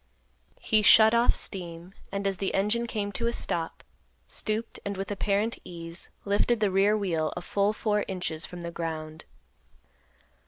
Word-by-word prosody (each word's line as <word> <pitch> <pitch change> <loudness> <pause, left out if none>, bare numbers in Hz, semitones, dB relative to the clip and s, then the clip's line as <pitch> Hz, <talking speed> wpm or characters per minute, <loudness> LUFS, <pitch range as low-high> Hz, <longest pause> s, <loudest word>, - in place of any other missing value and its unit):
He 215 -1 +2
shut 220 +1 +7
off 235 +1 +4
steam, 175 -1 -3 0.2
and, 200 0 -3
as 195 -1 0
the 195 - -2
engine 210 +4 +1
came 205 -3 -3
to 235 +3 -1
a - - +1
stop, 165 -7 -3 0.4
stooped, 220 +1 -1
and, 200 -1 -4
with 195 +1 -4
apparent 205 +3 0
ease, 170 -1 -7 0.2
lifted 205 +3 +2
the 210 -2 +2
rear 200 +3 +3
wheel 165 -6 -1
a - - -3
full 200 +3 +1
four 210 -1 0
inches 180 -4 0
from 175 -1 -7
the 170 - -4
ground. 160 -2 -5
200 Hz, 160 wpm, -28 LUFS, 170-215 Hz, 0.4 s, shut